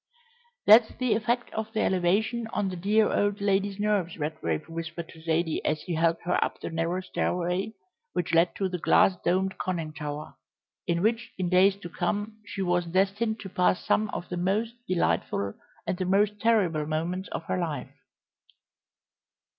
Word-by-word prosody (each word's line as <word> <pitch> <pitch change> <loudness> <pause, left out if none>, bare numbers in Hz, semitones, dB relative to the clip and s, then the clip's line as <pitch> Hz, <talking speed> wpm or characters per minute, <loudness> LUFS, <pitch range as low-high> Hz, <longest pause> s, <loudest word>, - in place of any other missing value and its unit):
"That's 220 +1 +7
the 255 -2 +1
effect 240 +3 -1
of 220 0 -3
the 220 - +1
elevation 205 +6 +1
on 205 -3 -1
the 185 - -5
dear 210 +5 +2
old 205 0 +1
lady's 200 0 0
nerves," 205 -5 0
Redgrave 150 - -2
whispered 165 0 -5
to 160 - -13
Zaidie 160 0 0
as 155 - -1
he 180 - -4
helped 165 +1 +1
her 180 - +2
up - - -4
the - - -5
narrow 165 +3 -1
stairway 180 +2 -1 0.4
which 175 -2 -2
led 165 +1 +4
to 195 - 0
the 180 -1 -4
glass 185 - +4
domed 190 +1 +1
conning 165 -4 -2
tower, 150 0 -6 0.5
in 170 0 +1
which 225 +1 0
in 185 -2 -1
days 190 +2 +5
to 175 - -6
come 205 +5 -2
she 205 -1 -4
was 175 -1 +1
destined 200 +5 +1
to 195 - -7
pass 180 0 +1
some 215 0 +2
of 175 - -5
the 180 - -3
most 205 +6 0
delightful 100 - 0 0.3
and 180 - -1
the 185 - 0
most 205 +2 +2
terrible 185 -10 +2
moments 170 +5 -2
of - - -4
her 180 - -2
life. 160 -4 -3
185 Hz, 170 wpm, -27 LUFS, 170-205 Hz, 0.5 s, That's